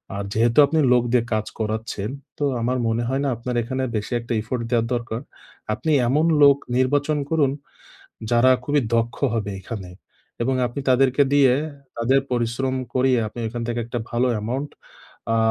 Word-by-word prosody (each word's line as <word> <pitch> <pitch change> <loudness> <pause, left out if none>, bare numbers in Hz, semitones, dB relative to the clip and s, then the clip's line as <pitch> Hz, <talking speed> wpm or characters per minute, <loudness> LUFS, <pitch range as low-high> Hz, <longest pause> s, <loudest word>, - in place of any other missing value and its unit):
আর 100 - -3
যেহেতু 115 +3 +2
আপনি 160 +2 +1
লোক 125 -1 +4
দিয়ে 125 -2 +3
কাজ 110 0 0
করাচ্ছেন, 110 -1 -3 0.3
তো - - -3 0.2
আমার 125 +2 0
মনে 115 +1 0
হয় 135 +1 0
না - - +1
আপনার 125 +1 -4
এখানে 130 +3 -3
বেশি 105 +3 -3
একটা 120 0 -4
effort 115 +2 -3
দেওয়া 115 -1 +2
দরকার। 120 0 -3 0.5
আপনি 155 +8 -2 0.2
এমন 150 +6 +2 0.2
লোক 140 -1 +7 0.2
নির্বাচন 145 +3 +1
করুন, 150 -4 +3 0.8
যারা 120 +2 +5
খুবই 145 +2 +2
দক্ষ 115 +1 0 0.2
হবে 105 -3 -2
এখানে। 95 -2 -7 0.5
এবং 130 +3 +1
আপনি 120 +4 -5
তাদেরকে 130 +2 +4
দিয়ে, 140 -3 +5 0.4
তাদের 130 +4 +3
পরিশ্রম 125 +2 -1 0.2
করিয়ে, 130 -1 +3
আপনি 120 - -8
এখান 120 +1 -5
থেকে 120 0 -1
একটা 120 0 -3
ভালো 120 +2 +1
amount 130 +6 -3 0.6
আ - - +2
120 Hz, 165 wpm, -22 LUFS, 115-135 Hz, 0.8 s, লোক